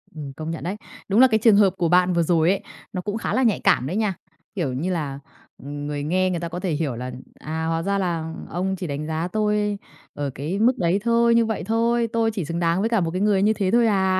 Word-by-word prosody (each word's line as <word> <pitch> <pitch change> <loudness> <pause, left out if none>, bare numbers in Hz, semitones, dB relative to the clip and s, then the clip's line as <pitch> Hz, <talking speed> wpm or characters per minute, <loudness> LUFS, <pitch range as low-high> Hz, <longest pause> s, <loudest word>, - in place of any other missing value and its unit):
Ừm, 145 -3 -7
công 155 +3 -5
nhận 165 - -6
đấy. 185 +4 -3 0.3
Đúng 205 +3 +3
là 260 - +8
cái 220 -3 +2
trường 225 -3 +7
hợp 200 -2 +5
của 170 -2 +1
bạn 180 +1 +4
vừa 170 -1 +2
rồi 165 0 +3
ấy, 195 +1 +1 0.3
nó 185 - -2
cũng 205 +3 -3
khá - - -3
là 260 - +2
nhạy 225 -5 +2
cảm 130 - +2
đấy 180 - -3
nha. 215 -2 +1 0.4
Kiểu 160 -9 -1
như 160 +9 -2
là, 145 -6 -3 0.4
ừm, 145 +1 -6
người 145 -1 -3
nghe 185 +5 +1
người 175 -2 -2
ta 170 0 -4
có 175 +2 -5
thể 180 -1 -2
hiểu 150 -4 -1
là 125 +2 -5 0.3
"À, 160 +2 -4
hóa 165 0 0
ra 200 +2 0
là 165 -4 -2 0.2
ông 190 +3 -2
chỉ 185 -2 -5
đánh 145 +1 -4
giá 160 +2 -2
tôi 210 +1 0 0.4
ở 145 -1 -3
cái 160 +9 -3
mức 240 +4 +3
đấy 175 +2 +1
thôi, 235 0 +3
như 230 0 +4
vậy 220 -2 -3
thôi. 230 +3 +1
Tôi 225 -1 +2
chỉ 200 -7 -3
xứng 170 +2 -3
đáng 170 +1 +1
với 220 +3 +1
cả 225 -4 +2
một 165 -1 -1
cái 185 +2 -2
người 205 -2 +3
như 215 +1 +4
thế 195 -3 -1
thôi 235 0 +4
à?" 190 -2 +2
185 Hz, 270 wpm, -23 LUFS, 160-210 Hz, 0.4 s, là